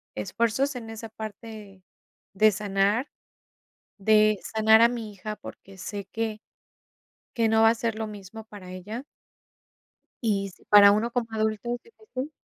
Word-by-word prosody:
esfuerzos 235 - 0
en 225 -2 -8
esa 225 0 -7
parte 215 -2 -9 0.5
de 215 +2 +5
sanar, 205 +5 0 0.9
de 215 +1 +4
sanar 220 0 +4
a 235 - +7
mi 230 -3 -5
hija, 210 +2 -6
porque 195 -1 -12
sé 200 +2 -6
que 225 -1 -3 0.9
que 230 -2 +2
no 220 0 +4
va 225 - +7
a 230 - +2
ser 230 0 -1
lo 220 - -2
mismo 210 +1 -10
para 200 -4 -11
ella 210 +7 -7 1.2
y 200 -3 0
si - - -21
para 205 -1 +8
uno 220 +3 +1
como 240 -2 -1
adulto 220 +2 -1
es 245 - -8
difícil 425 - -8
220 Hz, 150 wpm, -26 LUFS, 205-230 Hz, 1.2 s, para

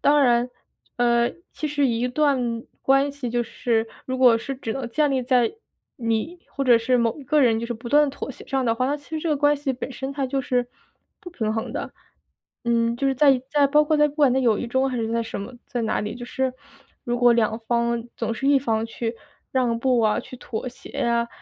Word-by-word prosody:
当 290 0 +4
然， 240 -1 +3 0.5
呃， 235 -1 +3 0.2
其 305 - -4
实 285 -2 +1
一 235 +1 0
段 250 -4 0 0.2
关 275 +1 +3
系 275 -3 -5
就 240 +1 0
是 225 -1 -1 0.2
如 260 0 -2
果 245 -3 +6
是 275 +4 -5
只 230 -4 -4
能 265 -3 -4
建 295 +4 +1
立 260 -2 0
在 245 -2 +2 0.5
你 230 +9 -1
或 275 - -3
者 240 -2 +6
是 250 +2 +2
某 235 +3 0
一 275 - -10
个 300 +3 +3
人 225 -2 +3
就 235 - -3
是 240 - -3
不 235 +2 -8
断 295 0 +5
妥 275 0 -6
协 - - -12
上 265 -1 0
的 230 -1 +2
话， 255 +2 0
那 290 +2 0
其 285 +2 -18
实 315 - -2
这 330 - -2
个 300 - +2
关 290 +1 +3
系 285 -1 -3
本 255 - -6
身 265 +2 -5
它 275 -2 -1
就 270 +1 -1
是 250 -1 0 0.5
不 355 - -9
平 220 -9 -2
衡 225 +2 -3
的。 - - -4 0.7
嗯， 235 0 +1
就 275 - -1
是 270 - +2
在 270 -2 +4
在 290 -1 +4
包 300 +2 +4
括 310 - +1
在 300 0 +5
不 290 - -11
管 285 -5 +4
在 265 - +2
友 230 -4 +3
谊 245 - -3
中 260 +3 +1
还 255 - -3
是 225 0 -2
在 230 0 +1
什 225 - -6
么， 200 +5 -7
在 240 -2 -3
哪 220 - 0
里， 210 - -4
就 245 -1 -7
是 260 +1 -1 0.5
如 240 0 -1
果 245 -1 +6
两 220 -1 +1
方 235 -1 +1
总 - - -2
是 270 +5 -1
一 280 -1 +5
方 225 -4 0
去 230 0 -4 0.4
让 245 -3 +1
步 250 -1 +2
啊， 215 -1 +2
去 - - -8
妥 245 0 -5
协 245 - -9
啊， 235 0 +1
250 Hz, 260 characters per minute, -24 LUFS, 235-275 Hz, 0.7 s, 果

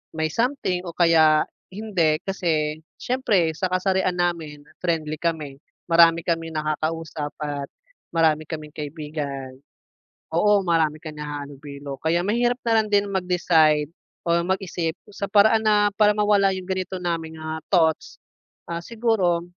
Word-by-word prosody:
may 160 0 0
something 230 - -1
o 170 - -7
kaya 160 -3 +5 0.3
hindi. 180 -8 +1
Kasi 155 -5 -1 0.2
siyempre 220 -10 +1
sa 185 +2 -2
kasarian 185 0 +1
namin, 165 -4 -2 0.2
friendly 155 -3 -1
kami, 155 -5 -3 0.3
marami 165 0 +5
kaming 165 -1 -1
nakakausap 155 0 -2
at 145 -1 -3 0.4
marami 160 -2 +2
kaming 155 -2 -6
kaibigan. 145 -3 -5 0.8
Oo, 205 +3 +4
marami 160 -3 +1
ka 155 - -7
nakakahalubilo 145 -1 -7
kaya 165 +2 +2
mahirap 240 +3 +1
na 225 -1 +4
lang - - -7
din 205 0 +3
mag-decide 165 -5 +3 0.4
o 170 0 +3
mag-isip 180 -3 -2 0.2
sa 200 0 -4
paraan 220 +1 +5
na 210 -1 +4
para 210 -1 +5
mawala 205 -2 +3
yung 185 -1 -7
ganito 185 -1 -3
naming, 165 -2 -3
ah, 160 0 -4
thoughts. 160 -4 +1 0.5
Ah, 170 0 -2
siguro, 210 -7 0
170 Hz, 130 wpm, -23 LUFS, 155-190 Hz, 0.8 s, kaya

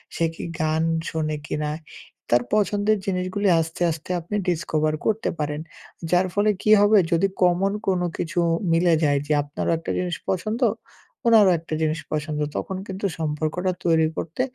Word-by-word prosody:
সে 165 - +1
কি - - -7 0.2
গান 160 0 +1 0.3
শোনে 155 -1 -2
কিনা, 150 0 -2 0.6
তার 120 +1 +4
পছন্দের 210 0 +2
জিনিসগুলি 185 +1 -1
আস্তে, 165 +2 -4
আস্তে 160 +1 -8
আপনি 175 +5 -5
ডিসকভার 155 -2 0
করতে 220 0 +1
পারেন। 150 0 -2 0.5
যার 180 +1 +4
ফলে 205 +2 +2
কি 215 - +3
হবে? 210 +1 +5
যদি 170 +3 +3 0.2
কমন 180 +2 +3 0.2
কোনো 180 -2 +1
কিছু 175 +2 -2 0.3
মিলে 170 0 +4
যায় 145 -2 +3
যে 155 - +2
আপনারও 145 +3 -3
একটা 165 - -5
জিনিস 175 -3 -2
পছন্দ, 215 +6 -1 0.7
ওনারও 215 -5 +7
একটা 165 0 -8
জিনিস 155 +1 0
পছন্দ। 155 0 -2 0.2
তখন 190 - -3
কিন্তু 190 +1 -4
সম্পর্কটা 155 +4 -1
তৈরি 160 -2 +4
করতে, 165 +9 -3
170 Hz, 155 wpm, -23 LUFS, 155-195 Hz, 0.7 s, ওনারও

